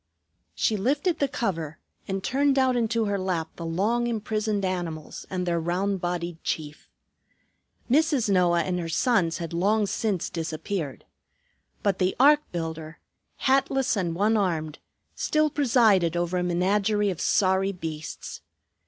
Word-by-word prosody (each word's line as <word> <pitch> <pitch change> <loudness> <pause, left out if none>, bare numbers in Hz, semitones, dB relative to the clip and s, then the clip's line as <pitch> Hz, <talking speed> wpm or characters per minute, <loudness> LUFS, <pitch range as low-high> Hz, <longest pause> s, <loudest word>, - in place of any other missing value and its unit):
She 215 - +1
lifted 290 - 0
the 280 - +2
cover, 170 - -3 0.3
and 195 0 -3
turned 275 +1 +2
out 260 -1 +3
into 230 -1 +1
her 200 -1 -1
lap 175 -4 -2
the 170 - -6
long 215 +8 0
imprisoned 215 -2 -1
animals 170 -4 -4
and 180 -1 -2
their 170 -1 0
round 185 +3 -1
bodied 175 -1 -3
chief. 150 -2 -4 1.0
Mrs. 285 -2 +2
Noah 175 -3 +3
and 180 -1 -2
her 165 -1 -4
sons 180 -3 +2
had 170 -1 -5
long 205 +5 +2
since 200 -3 -1
disappeared. 160 -1 -4 0.8
But 200 -3 +1
the 185 0 +1
ark 295 +3 +7
builder, 160 -2 -5 0.4
hatless 270 -1 +2
and 175 -5 -1
one 210 +4 +2
armed, 160 -6 -1 0.3
still 305 -1 +1
presided 220 - +3
over 175 +1 0
a - - 0
menagerie 200 +4 +1
of 180 - -6
sorry 190 0 +2
beasts. 160 -4 -7
190 Hz, 140 wpm, -26 LUFS, 170-225 Hz, 1.0 s, ark